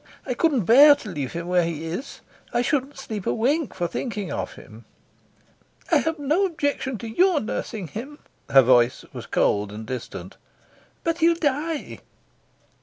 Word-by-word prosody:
I 255 - -1
couldn't 265 - +1
bear 285 - +8
to 245 -7 -9
leave 145 -7 -4
him 170 0 -4
where 180 -1 +3
he 165 -1 -4
is. 180 - -6 0.3
I 240 0 +1
shouldn't 275 +1 -1
sleep 220 -7 -6
a - - +2
wink 280 +7 0
for 175 -2 -1
thinking 205 - -4
of - - -4
him." 110 +2 -14 1.1
"I - - +6
have 320 0 -1
no 300 +6 +1
objection 285 -6 -2
to 230 - -7
your 350 +8 +3
nursing 215 -4 -4
him." 255 - -8 0.3
Her 135 -1 +7
voice 125 0 +3
was - - -8
cold 105 0 +1
and 110 +1 -8
distant. 130 +2 -7 0.7
"But 330 0 -1
he'll 335 0 +4
die." 305 0 -2
240 Hz, 165 wpm, -24 LUFS, -, 1.1 s, bear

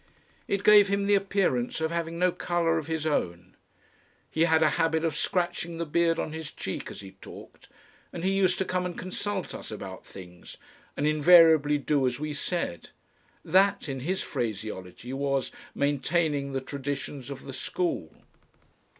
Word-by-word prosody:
It 200 0 -1
gave 210 -1 +8
him 200 0 0
the 205 - +3
appearance 195 -12 +1
of 160 0 -1
having 170 0 -3
no 180 +1 +3
colour 170 -2 0
of 155 - -7
his 160 -1 -2
own. 90 - -2 0.8
He 160 +1 +3
had 160 -1 +4
a 155 - +4
habit 160 0 +1
of 160 -3 -1
scratching 170 -1 -1
the 170 - -2
beard 165 +1 +2
on 155 - -3
his 160 -2 -6
cheek - - -5
as - - -8
he 95 -1 -10
talked, - - -12 0.4
and 170 - -6
he 190 +1 +1
used 185 -2 +2
to 190 - 0
come 180 0 -1
and 180 -1 -4
consult 190 +1 -4
us - - -7
about 95 -3 -7
things 90 -2 -12 0.4
and 145 - 0
invariably 155 -1 +6
do 145 -2 +1
as 125 +1 -2
we 150 0 -3
said. 145 - -3 0.6
That, 190 +2 +3
in 135 -2 -4
his 180 +9 -2
phraseology, 110 0 -5
was 135 -1 -1 0.2
"maintaining 145 0 0
the 135 - -1
traditions 140 -1 -5
of 140 -1 -7
the 135 - -8
school." 165 - -2
160 Hz, 165 wpm, -27 LUFS, 135-175 Hz, 0.8 s, gave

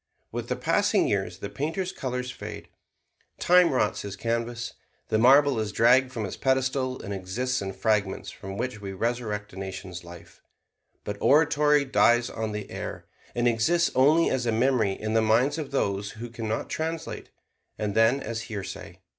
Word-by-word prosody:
With - - -4
the - - 0
passing - - +2
years 95 -3 -1
the 100 - -5
painter's 165 +6 -2
colors 125 -5 -4
fade; - - -8 0.7
time 180 -1 +5
rots 125 -5 +1
his 100 -1 -6
canvas; 115 +2 -3 0.4
the 110 - +2
marble 135 +1 +5
is 110 -1 -2
dragged 125 +4 +4
from 115 -5 -3
its 95 - -5
pedestal 130 0 0
and 100 - -4
exists 110 +7 -2
in 95 0 -3
fragments 105 -3 0
from 95 +1 -8
which 120 -2 -3
we 100 -1 -5
resurrect 105 -1 -3
a - - -11
nation's 95 -2 -6
life; 85 0 -13 0.6
but 105 0 -4
oratory 150 -1 +4
dies 120 -2 +3
on 110 -1 -3
the 105 -1 -6
air - - -6 0.3
and 120 0 +2
exists 160 +10 +2
only 150 +6 +4
as 125 -2 -1
a - - +2
memory 115 -3 +2
in 110 +2 -4
the 110 - +4
minds 120 +8 +2
of 150 - -4
those 100 -7 -1
who 115 +2 -8
can 115 -1 -5
not 110 - -2
translate, 160 +1 -4 0.5
and 105 -1 -2
then 115 +5 +3
as 115 -2 -4
hearsay. 95 -4 -7
115 Hz, 170 wpm, -26 LUFS, 105-130 Hz, 0.7 s, time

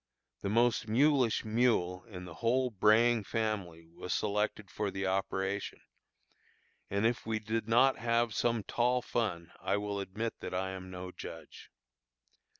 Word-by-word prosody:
The 100 - -2
most 115 +1 +2
mulish 130 0 +3
mule 110 -5 +1
in 90 -6 -9
the 85 - -9
whole 125 +2 +2
braying 110 +2 +4
family 100 -7 -3
was 90 +2 -7
selected 105 -1 -1
for 105 -1 -2
the 95 0 -3
operation, 95 +1 -1 1.1
and 100 +2 0
if 120 0 0
we 110 -1 0
did 110 +1 -2
not 130 +4 +4
have 115 -1 +1
some 115 -1 +1
tall 125 +4 +1
fun 90 -7 -2
I 100 - +1
will 105 -1 -3
admit 100 +4 -4
that - - -5
I 95 +1 -1
am 95 -1 -7
no 90 0 -7
judge. - - -10
110 Hz, 150 wpm, -32 LUFS, 95-115 Hz, 1.1 s, braying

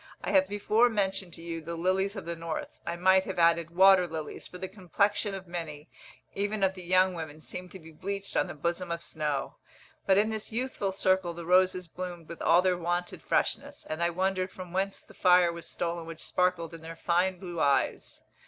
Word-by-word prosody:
I - - -1
have 285 -1 +5
before 215 +4 +3
mentioned 195 -4 -1
to 165 - -10
you 165 -1 -4
the 170 +2 -5
lilies 190 +4 0
of 195 - -6
the 170 0 -3
north, 165 -1 -4 0.2
I 170 - -1
might 190 +2 +4
have 190 - -5
added, 170 -1 +4
water 190 -1 +7
lilies, 155 -2 -6
for 180 - -10
the 190 - -5
complexion 200 +2 0
of 190 -1 -8
many, 160 -5 -6 0.4
even 205 +1 -1
of 190 0 +3
the 185 - -9
young 185 +1 +3
women, 155 -3 -7
seem 180 +3 -7
to 190 - -10
be 160 -2 -13
bleached 195 +5 -5
on - - +2
the 175 - -7
bosom 170 +4 -2
of 170 0 -3
snow. 150 -3 -3 0.5
But 190 -1 +5
in 215 +2 +3
this 220 0 -4
youthful 230 -4 -2
circle 185 -2 +1
the 170 0 -7
roses 185 0 +3
bloomed 175 -1 -7
with 170 - -8
all 170 +3 +5
their 180 -1 +2
wonted 175 +1 -2
freshness, - - -1
and 155 +2 -4
I 170 - +3
wondered 185 +1 0
from 185 -2 -10
whence 195 +1 -1
the - - -17
fire 180 -2 +5
was 170 -1 -7
stolen 170 -1 -3
which 165 -1 -8
sparkled 180 -2 0
in 165 - -9
their 165 +1 -8
fine 180 +3 +1
blue 175 -2 -6
eyes. 140 -2 0
180 Hz, 210 wpm, -29 LUFS, 170-190 Hz, 0.5 s, water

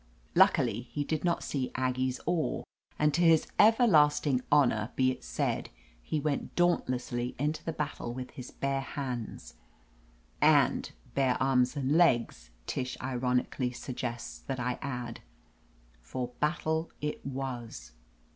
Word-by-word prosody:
Luckily - - +4
he 145 +3 -1
did 155 +1 -2
not 170 -1 +1
see 135 -3 -2
Aggie's 130 0 0
oar, 170 -2 0 0.3
and 150 -1 +2
to 170 - +1
his 165 -2 +5
everlasting 155 - +5
honor 120 -6 +3
be 130 0 +3
it - - -8
said, - - -2 0.3
he 150 - -2
went 145 -1 -2
daunt 175 0 +3
lessly 125 -1 -2
into 150 +3 -1
the 165 - -2
battle 150 -6 -4
with 125 +1 -6
his 125 -1 -8
bare 135 0 -1
hands. 130 -4 -5 0.9
"And - - +4 0.2
bare 135 -2 +2
arms 130 0 +2
and^legs," 130 - +2 0.2
Tish 125 -1 -3
ironically 125 0 -1
suggests 125 -2 -5
that 135 -2 -5
I 125 0 -2
add. 125 -4 -4 0.8
For 120 - -4
battle 160 +1 0
it 150 0 -4
was. 125 - -5
130 Hz, 130 wpm, -30 LUFS, 125-150 Hz, 0.9 s, his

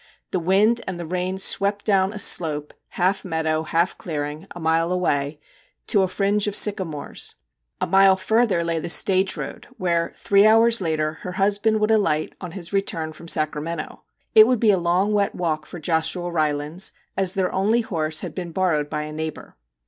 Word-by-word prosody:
The 185 - 0
wind 200 +7 +3
and 185 - -4
the 170 - -6
rain 180 +2 -2
swept 200 +1 +1
down 195 -2 +2
a 210 - -8
slope, 155 -7 0
half 185 +2 0
meadow, 160 -3 -1
half 165 +3 0
clearing 150 +1 -5
a 175 - -10
mile 165 +1 +1
away 150 -5 -1 0.5
to 200 - +3
a 190 - +2
fringe 200 +2 0
of 205 - -2
sycamores. 185 -8 0 0.4
A - - 0
mile 195 0 +5
further 215 -2 +1
lay 165 -1 -1
the 160 - -5
stage 190 +2 +3
road, - - -7
where, 170 -4 0
three 200 +1 +4
hours 225 0 +5
later, 155 -2 -2
her 180 - -6
husband 205 +3 +1
would 215 +1 +2
alight 165 -8 +1
on 180 -3 -7
his 180 -1 -7
return 165 -5 -2
from 165 +2 -13
Sacramento. 155 0 -2 0.3
It 215 0 +8
would 250 -2 +1
be 220 -2 +4
a 195 - +2
long 180 +4 +1
wet 200 -1 0
walk 155 -3 -2
for 175 - -9
Joshua 165 +2 -1
Rylands, 155 +2 -1 0.2
as 190 0 +1
their 190 -2 0
only 215 +5 +2
horse 155 -7 -2
had - - -6
been 175 -2 -6
borrowed 160 -5 0
by 150 0 -3
a 150 0 -7
neighbour. 160 0 -6
180 Hz, 185 wpm, -22 LUFS, 160-200 Hz, 0.5 s, It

